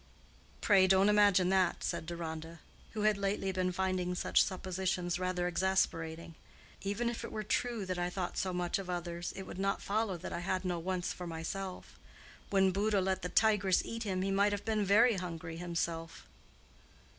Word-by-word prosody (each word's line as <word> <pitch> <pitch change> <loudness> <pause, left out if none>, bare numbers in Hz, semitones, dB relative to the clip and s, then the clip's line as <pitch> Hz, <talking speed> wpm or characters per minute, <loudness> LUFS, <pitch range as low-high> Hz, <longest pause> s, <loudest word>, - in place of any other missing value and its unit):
"Pray 195 -3 +5
don't 190 +2 +5
imagine 205 -3 +5
that," 185 -2 +2
said 160 - -2
Deronda, 165 -1 -6 0.3
who 215 - -3
had 210 -1 +3
lately 195 -1 0
been 185 -1 0
finding 185 -1 -1
such - - +3
suppositions 185 -1 -2
rather 180 -1 -1
exasperating. 170 -3 0 0.5
"Even 205 +4 -1
if 235 -1 -3
it 235 - -6
were 215 - -3
true 230 0 -1
that 185 -1 -3
I 175 0 0
thought 180 -1 -4
so 190 - -1
much 180 +1 -1
of 190 -2 -7
others, 175 -1 -3
it 190 - -5
would 185 - -8
not 195 0 0
follow 205 -2 -1
that - - -7
I - - -2
had 185 +1 -2
no 175 -2 -1
wants 180 +1 -2
for 180 - -7
myself. 180 +3 -6 0.5
When 190 -1 +4
Buddha 205 +2 +1
let 190 0 0
the 180 - -3
tigress 205 -4 +3
eat 230 0 -5
him 190 -4 -1
he 195 - 0
might 200 +1 +3
have 205 - -4
been 215 -2 +1
very 215 +3 +5
hungry 165 -2 -5
himself." 170 -1 -3
185 Hz, 180 wpm, -33 LUFS, 175-200 Hz, 0.5 s, Pray